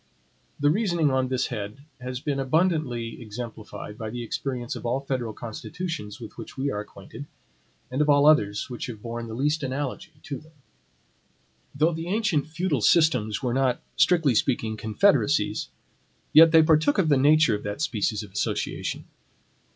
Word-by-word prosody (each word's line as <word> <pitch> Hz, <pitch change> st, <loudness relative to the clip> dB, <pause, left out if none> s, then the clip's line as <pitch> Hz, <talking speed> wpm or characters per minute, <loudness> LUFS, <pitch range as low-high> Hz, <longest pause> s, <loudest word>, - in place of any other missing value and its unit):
The 145 Hz, +1 st, +3 dB
reasoning 175 Hz, -6 st, +1 dB
on 130 Hz, -1 st, +1 dB
this 130 Hz, 0 st, 0 dB
head 105 Hz, +5 st, -6 dB
has 125 Hz, 0 st, -5 dB
been 140 Hz, 0 st, -2 dB
abundantly 135 Hz, -6 st, 0 dB
exemplified 110 Hz, -1 st, -8 dB
by 110 Hz, -1 st, -4 dB
the 120 Hz, +2 st, -5 dB
experience 120 Hz, +1 st, -4 dB
of -, -, -8 dB
all 120 Hz, +3 st, 0 dB
federal 130 Hz, -4 st, -3 dB
constitutions 115 Hz, -, -6 dB
with 115 Hz, 0 st, -10 dB
which 115 Hz, -, -9 dB
we 140 Hz, +1 st, -1 dB
are 105 Hz, -, -3 dB
acquainted, 105 Hz, +7 st, -10 dB, 0.6 s
and 130 Hz, +3 st, 0 dB
of 150 Hz, -, +2 dB
all 145 Hz, 0 st, +5 dB
others 105 Hz, -10 st, +3 dB
which 125 Hz, -3 st, -6 dB
have 110 Hz, -4 st, -8 dB
borne 115 Hz, 0 st, -5 dB
the 110 Hz, -, -6 dB
least 150 Hz, +5 st, 0 dB
analogy 140 Hz, +5 st, -4 dB
to 140 Hz, -4 st, -5 dB
them. 155 Hz, +1 st, -20 dB, 1.2 s
Though 155 Hz, +4 st, +2 dB
the 165 Hz, +1 st, -5 dB
ancient 185 Hz, -7 st, 0 dB
feudal 160 Hz, -4 st, -1 dB
systems 125 Hz, -8 st, +3 dB
were 125 Hz, -2 st, 0 dB
not, 130 Hz, -1 st, +1 dB, 0.2 s
strictly 150 Hz, -1 st, +4 dB
speaking, 110 Hz, -1 st, 0 dB
confederacies, 110 Hz, -1 st, +1 dB, 0.6 s
yet 160 Hz, +1 st, +9 dB
they 160 Hz, -1 st, +7 dB
partook 155 Hz, -2 st, +3 dB
of 170 Hz, -5 st, +2 dB
the 145 Hz, -, +5 dB
nature 150 Hz, -2 st, +5 dB
of 105 Hz, -, -2 dB
that 105 Hz, +4 st, -5 dB
species 110 Hz, -6 st, -1 dB
of 100 Hz, -, -12 dB
association. 100 Hz, -, -3 dB
130 Hz, 165 wpm, -25 LUFS, 115-155 Hz, 1.2 s, yet